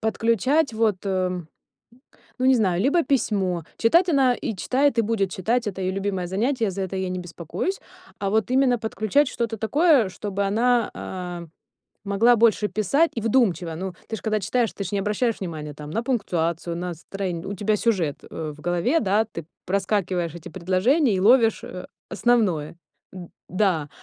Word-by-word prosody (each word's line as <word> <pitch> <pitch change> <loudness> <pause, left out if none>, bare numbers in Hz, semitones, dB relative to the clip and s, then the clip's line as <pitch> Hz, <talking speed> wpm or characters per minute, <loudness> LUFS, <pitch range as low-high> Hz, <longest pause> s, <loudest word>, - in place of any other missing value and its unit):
подключать 230 - +1
вот, 220 -3 +1
эм, 185 -3 -1 0.9
ну, 255 - +1
не 265 - +6
знаю, 185 -5 +1
либо 310 +7 +3
письмо. 195 - 0
Читать 340 +11 +4
она 270 -5 +4
и 220 -4 -4
читает, 260 +4 +1
и - - +5
будет 205 -3 0
читать, 230 +6 0
это 190 -1 -6
её 185 0 -1
любимое 195 -2 -2
занятие, 225 +4 0
за 195 +1 -4
это 190 0 -4
я 190 -1 -2
не 185 - -3
беспокоюсь. 175 - -4 0.4
А 200 - -2
вот 220 +2 +1
именно 255 -1 +3
подключать 220 +5 +1
что-то 230 -3 -3
такое, 280 - +3
чтобы 200 +1 -4
она, 235 +3 +2
а, 180 -2 -6 0.6
могла 220 +5 +4
больше 220 -2 +3
писать 215 - +2
и 230 - -2
вдумчиво. 210 -8 +1
Ну, 185 +2 -5 0.2
ты 220 - -2
ж - - -11
когда 215 -1 0
читаешь, 230 +4 0
ты 200 - -5
же 190 - -5
не 200 - +1
обращаешь 210 +3 0
внимание 155 -5 -5
там 150 0 -9
на 225 +7 -1
пунктуацию, 170 -8 -1
на 175 0 -4
строен 180 0 -5
у 200 - -4
тебя 210 +2 +1
сюжет, 190 -11 0
э, 155 -1 -5
в 150 - -16
голове, 175 - +1
да, 210 +2 +2
ты 170 -7 -8 0.2
проскакиваешь 185 -3 -1
эти 170 - -9
предложения 190 - +2
и - - 0
ловишь, 225 +2 +4
а, 180 0 -8 0.2
основное. 195 -12 +1 0.4
Д 180 -2 -9 0.2
да. 180 -6 +1
200 Hz, 175 wpm, -24 LUFS, 180-235 Hz, 0.9 s, не